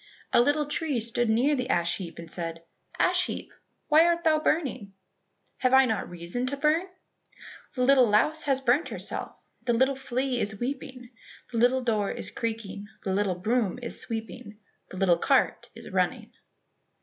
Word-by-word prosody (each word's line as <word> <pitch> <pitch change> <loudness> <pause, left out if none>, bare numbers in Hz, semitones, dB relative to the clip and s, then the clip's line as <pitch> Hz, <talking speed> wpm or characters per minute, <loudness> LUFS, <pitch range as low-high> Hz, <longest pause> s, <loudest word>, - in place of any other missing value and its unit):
A - - +7
little 290 +4 +2
tree 295 -3 -1
stood 230 +1 0
near 255 +7 +3
the 250 -1 -3
ash 170 -5 +1
heap 170 -4 -8
and 170 -1 -9
said, 165 -1 -5 0.3
"Ash 365 0 +2
heap, - - -6 0.3
why 310 +1 +6
art 340 0 +1
thou 310 -1 +3
burning?" 265 - -1 0.6
"Have 255 0 +3
I 265 0 +7
not 220 -4 -2
reason 175 +9 -4
to 280 +2 -2
burn?" 310 +5 +2 0.9
"The 250 - 0
little 255 -3 +5
louse 305 +10 +3
has 270 -2 +2
burnt 265 +5 +2
herself, - - -5 0.3
The 240 - 0
little 260 +4 +2
flea 260 -1 -2
is 205 0 -3
weeping, 255 -1 -5 0.4
The 230 - -1
little 250 +2 +3
door 215 -4 0
is - - -4
creaking, 220 -3 -4 0.2
The 190 - -1
little 195 -2 +1
broom 215 +3 0
is 235 - -2
sweeping, 225 -1 -6 0.3
The 185 - -9
little 180 -3 +3
cart - - +1
is - - -10
running." - - -1
245 Hz, 170 wpm, -27 LUFS, 205-275 Hz, 0.9 s, A